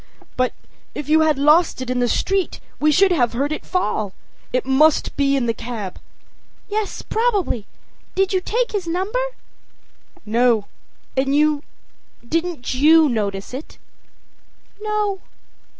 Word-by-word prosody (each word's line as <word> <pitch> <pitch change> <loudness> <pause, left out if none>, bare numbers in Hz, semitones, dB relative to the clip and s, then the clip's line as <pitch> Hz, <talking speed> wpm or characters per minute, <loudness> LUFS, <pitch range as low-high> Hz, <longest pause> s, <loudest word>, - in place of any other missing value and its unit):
â 255 0 -4
âBut - - -28 0.4
if 295 - -5
you 315 +1 +5
had 310 -2 +3
lost 300 +4 +4
it 255 -1 -3
in 250 - 0
the 245 - +2
street 385 +9 0 0.2
we 305 0 +4
should 380 +5 +4
have 245 -9 +2
heard 280 +5 -1
it 305 - -3
fall. 215 - -1 0.4
It 255 - 0
must 290 +4 +3
be 280 -1 +2
in 265 -3 +1
the 230 - +1
cab.â 225 - -10
âYes, 430 -2 -2
probably. 410 - 0 0.5
Did 385 0 +1
you 375 - +2
take 475 +6 -1
his 395 -5 -3
number?â 385 +9 -1 1.0
âNo. 230 -1 +3 0.5
And 270 +1 +1
you 300 -1 +3 0.7
didn't 330 -3 -2
you 310 +4 +6
notice 200 -3 -2
it?â 310 +7 -15
âNo. 420 -2 -1
300 Hz, 140 wpm, -21 LUFS, 250-370 Hz, 1.0 s, you